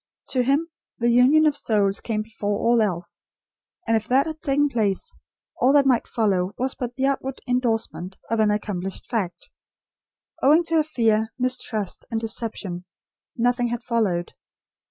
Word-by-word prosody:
To 255 - +2
him, 280 +6 +1 0.3
the 240 0 +2
union 260 +6 +5
of 300 -2 +3
souls 205 -7 +1
came 215 -2 -2
before 205 -2 -3
all 235 +1 +3
else; 180 -5 -3 0.6
and 225 - +2
if 220 -1 -1
that 265 +3 +3
had 315 -1 -6
taken 290 -2 +2
place, 225 - -1 0.5
all 260 +2 +4
that 285 -1 +5
might 255 -3 +2
follow 195 -4 0
was 260 +1 0
but 245 -1 -5
the 265 - 0
outward 270 -1 -1
indorsement 225 -7 -1
of 230 - +1
an 215 -1 +4
accomplished 200 -3 -3
fact. 200 -7 -3 0.9
Owing 305 +5 +5
to 330 -1 0
her 310 - +4
fear, 225 -7 +1
mistrust, 250 -5 -2
and 225 -2 -1
deception, 220 -5 -3 0.5
nothing 245 0 +2
had 240 0 -4
followed. 200 -8 0
235 Hz, 155 wpm, -23 LUFS, 210-265 Hz, 0.9 s, union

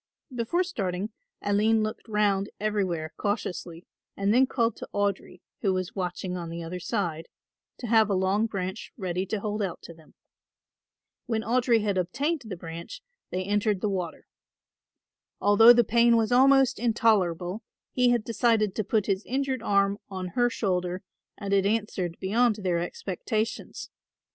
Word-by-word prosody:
Before 250 +10 0
starting 200 - -3 0.3
Aline 215 +2 +2
looked 215 +2 -5
round 205 -2 +1
everywhere 190 -7 -1
cautiously 180 -4 -3 0.3
and 200 +1 +2
then 260 +2 +5
called 235 -3 0
to - - -8
Audry, 200 -3 -2 0.2
who 195 -2 +2
was 185 -1 -3
watching 180 -1 -3
on 170 -2 -5
the 170 0 -5
other 175 +2 -5
side, 175 -4 -2 0.5
to - - -7
have 220 -2 +4
a 200 - +2
long 190 +4 +1
branch 190 0 -5
ready 185 -2 -2
to 215 - -2
hold 210 +1 -3
out 190 -4 -3
to 170 - -10
them. 160 -1 -21 1.1
When 220 -2 -1
Audry 235 -1 +2
had 200 -3 +1
obtained 275 - -1
the 195 -5 -6
branch 170 - -8 0.3
they 185 +1 -2
entered 205 +1 +1
the 210 - 0
water. 180 -4 -4 1.1
Although 205 +3 +7
the 240 0 +4
pain 235 +2 +4
was 225 +1 +1
almost 270 0 +5
intolerable 210 -5 +1 0.3
he 250 -1 +3
had 240 -2 +2
decided 225 -3 +1
to 215 - -1
put 210 0 0
his 195 0 0
injured 265 -1 -1
arm 200 -2 +2
on 185 -2 -5
her 245 +4 +2
shoulder 180 -4 -2 0.3
and 200 -1 -3
it 195 0 +3
answered 200 -5 -1
beyond 225 +4 +2
their 185 -5 -1
expectations. 210 +5 -4
205 Hz, 155 wpm, -27 LUFS, 185-230 Hz, 1.1 s, Although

